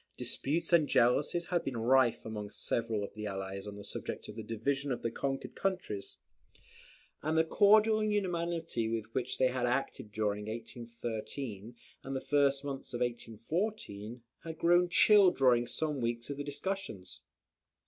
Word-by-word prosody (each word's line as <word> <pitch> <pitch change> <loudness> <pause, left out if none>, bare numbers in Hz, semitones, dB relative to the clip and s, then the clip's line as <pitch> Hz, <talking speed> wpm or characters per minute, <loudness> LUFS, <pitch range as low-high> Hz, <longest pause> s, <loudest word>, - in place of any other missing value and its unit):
Disputes 165 +5 -1
and 160 -4 +6
jealousies 145 +9 +3
had 175 -2 0
been 130 -3 -3
rife 125 +1 +3
among 105 -2 -5
several 115 -2 -2
of 100 - -6
the 105 0 -5
Allies 95 0 -5
on 100 - -6
the 100 - -9
subject 100 - -5
of - - -8
the 110 - -5
division 135 +6 -2
of 125 - -3
the 115 - 0
conquered 135 -1 -3
countries; 180 - -3 1.0
and 155 +2 0
the 160 - +6
cordial 215 +5 +5
unanimity 170 - -1
with 115 -2 -2
which 130 0 -2
they 130 - +4
had 125 -1 0
acted 125 -4 -2
during 105 -1 -1
1813 115 0 -6 0.3
and 135 0 -4
the - - 0
first 140 0 +2
months 135 -3 -5
of - - -4
1814, 120 - -3 0.2
had 160 -1 -6
grown 175 +2 +4
chill 205 +1 +7
during 125 -7 +3
some 150 -2 -2
weeks 120 +2 -2
of 145 0 -4
discussions. 145 - -4
130 Hz, 155 wpm, -32 LUFS, 115-160 Hz, 1.0 s, chill